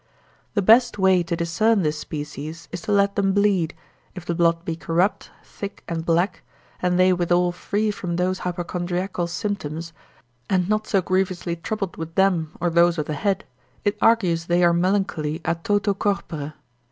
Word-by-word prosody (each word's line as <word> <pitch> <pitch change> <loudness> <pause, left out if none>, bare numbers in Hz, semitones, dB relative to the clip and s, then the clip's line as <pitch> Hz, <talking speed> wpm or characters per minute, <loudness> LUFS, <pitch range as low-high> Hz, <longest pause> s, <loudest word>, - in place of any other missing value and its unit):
The 205 - +2
best 230 +3 +5
way 190 -2 +4
to 170 0 -2
discern 190 +6 +2
this 150 0 -1
species, 150 +1 -6
is - - -5
to 210 - -4
let 200 0 +3
them 195 -1 +2
bleed, 200 -5 +2 0.4
if 180 -2 -8
the 175 - -1
blood 170 0 +2
be 165 - -2
corrupt, 170 +4 0
thick 200 0 -8
and 165 -1 -3
black, 170 +3 +1 0.4
and 180 0 +1
they 185 0 +5
withal 175 0 +2
free 205 +4 -1
from 180 -4 -4
those 185 +1 0
hypochondriacal 175 0 -2
symptoms, 170 -4 -4 0.6
and 180 -2 +2
not 215 +1 0
so 195 -3 +2
grievously 185 -2 0
troubled 195 +3 -4
with 165 +1 -6
them, 180 -5 +1
or 175 0 0
those 170 +1 +4
of 150 - -1
the 155 - -3
head, 195 +5 -1 0.4
it 205 - +2
argues 180 -8 +3
they 175 +1 +3
are 170 0 +5
melancholy, 170 -4 0
a - - +2
toto 205 +4 0
corpore. 160 -7 -3
180 Hz, 170 wpm, -23 LUFS, 165-195 Hz, 0.6 s, best